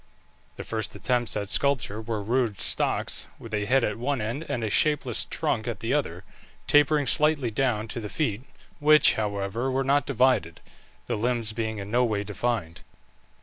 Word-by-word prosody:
The - - -7
first 110 -4 -4
attempts 120 -4 0
at 100 -1 -3
sculpture 115 -3 +1
were 110 -2 -3
rude 115 -2 0
stocks, - - 0
with 115 - -11
a 105 -1 0
head 130 +3 +3
at 105 0 -1
one 135 +2 -1
end 120 +9 -4
and 125 -5 -2
a 110 - -1
shapeless 145 -3 +2
trunk - - -2
at - - -3
the - - -2
other, - - -2 0.4
tapering 145 0 +4
slightly 145 -2 +1
down 110 -2 0
to 120 - -4
the 105 -2 -6
feet, 115 -7 -1 0.4
which, 150 0 +6
however, 105 +3 -2
were 135 +1 0
not 140 +2 +2
divided, 125 - +1 0.5
the - - -2
limbs 115 -2 0
being 110 -1 -3
in 100 0 -7
no 125 +2 +3
way 105 -4 0
defined. 105 -5 -3
115 Hz, 175 wpm, -26 LUFS, 105-135 Hz, 0.5 s, which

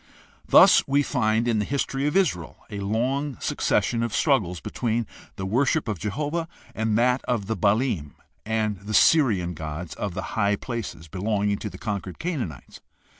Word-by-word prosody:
Thus - - +7
we 140 +1 +3
find, 110 -1 +1
in 115 -2 +2
the - - +1
history 140 +3 -1
of 150 - +1
Israel, 90 - 0
a 100 - -4
long 125 +7 -1
succession 115 -1 0
of 115 -2 -2
struggles 105 - +1
between 115 - -2 0.3
the 95 - -5
worship 130 +8 +1
of 105 -5 -2
Jehovah 150 - -2 0.3
and 110 -1 0
that 125 +2 +2
of 120 -5 -1
the 110 +3 -2
Baalim 105 - 0 0.3
and 110 -2 -1
the 105 +2 -4
Syrian 105 - +4
gods 80 0 -6
of 95 +3 -4
the - - -3
high 100 -2 +2
places 115 -8 -6
belonging 100 +3 -1
to 105 - -4
the - - -10
conquered 100 -4 -4
Canaanites. 135 - -5
110 Hz, 165 wpm, -25 LUFS, 100-130 Hz, 0.3 s, Thus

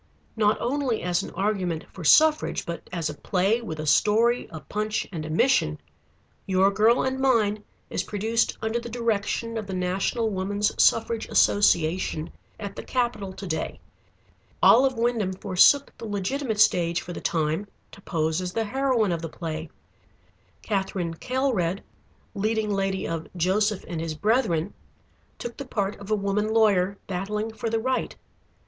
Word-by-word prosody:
"Not 215 -1 +2
only 255 -2 -1
as 175 0 +1
an - - -7
argument 185 -4 -1
for 185 - -8
suffrage 305 - +4
but 170 0 -6
as 170 -3 -2
a 150 - -4
play 195 +8 0
with 160 -9 -6
a 155 - -3
story, 220 - +3
a 160 - -7
punch, 210 +7 -2
and 165 -4 -5
a - - -7
mission, 155 - +2 0.7
'Your 190 +1 +3
Girl 220 +4 +3
and 260 0 -1
Mine' 215 -6 +2 0.2
is - - -2
produced 220 +3 -1
under 220 +2 0
the 235 - -8
direction 230 0 -1
of 210 - -7
the 190 - -4
National 190 +5 0
Woman's 200 +2 0
Suffrage 225 0 +2
Association 170 -4 +2 0.3
at 200 -2 -6
the - - -5
Capitol 235 -6 -2
to 195 - -8
day. 160 -4 -3 0.8
"Olive 260 +1 +6
Wyndham 230 -5 0
forsook 195 +9 +4
the - - -6
legitimate 215 +3 -2
stage 170 -4 +3
for 175 - -7
the - - -7
time 160 +4 -1 0.2
to 200 - -14
pose 160 -1 -1
as 180 0 -4
the 225 -1 0
heroine 250 -3 +1
of 170 -1 -2
the 165 - -5
play. 160 -1 -5 0.9
Katherine 190 -4 -2
Kaelred, 215 -4 -1 0.5
leading 215 0 0
lady 195 -1 -1
of 165 -1 -4
'Joseph 200 +4 +1
and 165 -2 -4
his 165 -1 -3
Brethren,' 205 -3 +1 0.6
took 240 0 -7
the 275 - -6
part 205 -4 -1
of 200 0 -10
a 215 - +3
woman 210 +1 -1
lawyer 200 -3 +3
battling 210 +4 -3
for 225 +1 -3
the 225 0 0
right. 260 +3 -1
205 Hz, 160 wpm, -25 LUFS, 180-225 Hz, 0.9 s, Olive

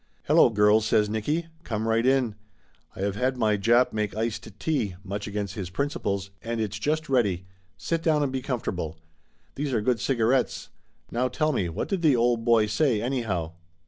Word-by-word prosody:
"Hello, - - +5
girls 105 0 +4
!" - - 0
says 105 -1 +2
Nicky. 145 +10 -1 0.2
"Come 110 -1 -2
right 115 +1 +2
in. 130 -3 +2 0.6
I - - -7
have 100 0 -1
had 130 +3 0
my 110 -3 +2
Jap 120 +5 +3
make 105 -2 -2
iced 115 0 -2
tea 115 - -1
much 100 +1 -5
against 100 -2 -3
his 95 -4 -5
principles 100 -4 -2
and 115 0 -3
it's 105 -2 -2
just 155 +6 -1
ready! 100 -9 +1 0.3
Sit 165 -1 -2
down 155 -2 +2
and 140 - -1
be 130 0 -2
comfortable. 90 - -3 0.6
These 140 -1 -3
are 115 - +2
good 120 +1 +1
cigarettes. 125 +2 +1 0.4
Now 125 +2 +1
tell 155 +5 0
me, 90 -9 0
what 80 - -3
did 195 -3 -1
the 155 -5 +4
old 120 -1 +2
boy 115 -2 +4
say, 115 +1 +1
anyhow?" 110 -10 -2
115 Hz, 185 wpm, -26 LUFS, 105-130 Hz, 0.6 s, Hello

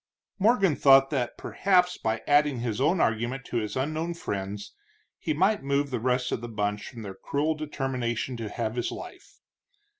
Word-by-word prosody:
Morgan 195 -6 +4
thought 135 0 +6
that, 125 -5 -1
perhaps 180 -2 +2
by 110 0 -2
adding 145 -3 +3
his 120 0 -2
own 165 +6 +3
argument 120 +3 0
to 120 - -1
this 105 -2 -4
unknown 155 +5 -2
friend's, 100 -7 -5 0.5
he 160 - -2
might 190 +8 +2
move 140 +1 0
the 125 - -1
rest 125 +1 0
of - - -2
the 120 - -6
bunch 105 -1 -2
from 115 -4 -9
their 100 -2 -6
cruel 145 +10 -1
determination 130 -5 -3
to 115 -2 -4
have 110 -1 -3
his 120 - -1
life. 365 - -10
135 Hz, 175 wpm, -27 LUFS, 115-155 Hz, 0.5 s, thought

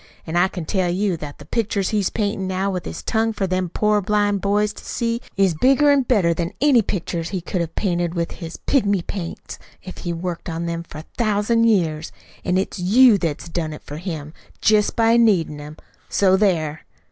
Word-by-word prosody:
An' 160 - -5
I 175 +2 +4
can 180 -4 -6
tell 185 0 0
you 190 +1 0
that 150 -2 -8
the 145 - -13
pictures 200 +1 -1
he's 205 -4 +1
paintin' 200 -3 -2
now 190 +1 -1
with 180 -2 -4
his - - -6
tongue 225 0 0
for 200 -2 -1
them 185 -1 -1
poor 210 +3 +1
blind 205 0 +1
boys 210 +1 +1
to - - -12
see 235 0 -2 0.2
is 195 -3 +3
bigger 275 - +4
an' 285 -1 +4
better 205 -10 +2
than 170 +3 -3
any 275 -4 +5
pictures 170 -4 -3
he 190 - -2
could 175 +1 -3
have 165 -1 -4
painted 175 -3 -1
with 170 -1 -1
with - - -10
his 165 -2 -7
pigmy 205 -9 +1
paints 175 -5 -6 0.2
if 185 - -9
he 175 - -3
worked 170 0 -4
on 165 +1 -3
'em 170 0 -3
for 170 -2 -11
a 155 - -8
thousand 230 +1 +2
years. 165 -8 +1 0.3
An' 180 - +1
it's 190 +1 -2
YOU 215 +4 +5
that's 165 -1 -3
done 165 -2 -3
it 150 - -10
for 145 - -8
him, 155 -3 -6 0.3
jest 210 -1 +3
by 230 0 +4
needin' 180 -10 +2
him. 150 +1 -9 0.3
So 190 -2 +3
there!" 165 -6 +1
185 Hz, 210 wpm, -21 LUFS, 170-210 Hz, 0.3 s, any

